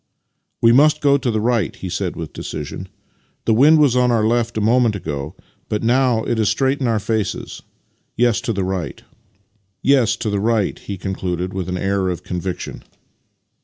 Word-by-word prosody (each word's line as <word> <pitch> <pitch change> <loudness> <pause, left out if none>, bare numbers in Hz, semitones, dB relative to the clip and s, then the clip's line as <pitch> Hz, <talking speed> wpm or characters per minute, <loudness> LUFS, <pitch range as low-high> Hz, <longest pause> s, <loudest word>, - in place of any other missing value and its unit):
" - - -53
We 115 - +7
must 150 +5 +5
go 140 -1 +4
to 125 - -1
the 110 -2 0
right," 115 0 0
he 95 - -7
said 90 0 -3
with 80 -3 -7
decision. - - -6 0.3
" - - -42
The 115 - +3
wind 145 +8 +6
was 145 -5 +4
on 125 0 +3
our 115 -3 +2
left 120 0 0
a - - 0
moment 115 0 +3
ago, 75 -3 -5 0.3
but 105 +1 -2
now 120 -1 +2
it 115 - -1
is 110 - +2
straight 135 +1 0
in 130 - +1
our 115 -1 +2
faces. 110 -1 -3 0.6
Yes, 120 -1 +2
to 130 - -2
the 100 -3 -1
right," 95 -2 -4 0.8
he 110 -5 +1
concluded 90 -1 -3
with 95 -2 -4
an 90 - -2
air 95 0 0
of 90 - -4
conviction. 90 0 -5
110 Hz, 175 wpm, -20 LUFS, 95-120 Hz, 0.8 s, We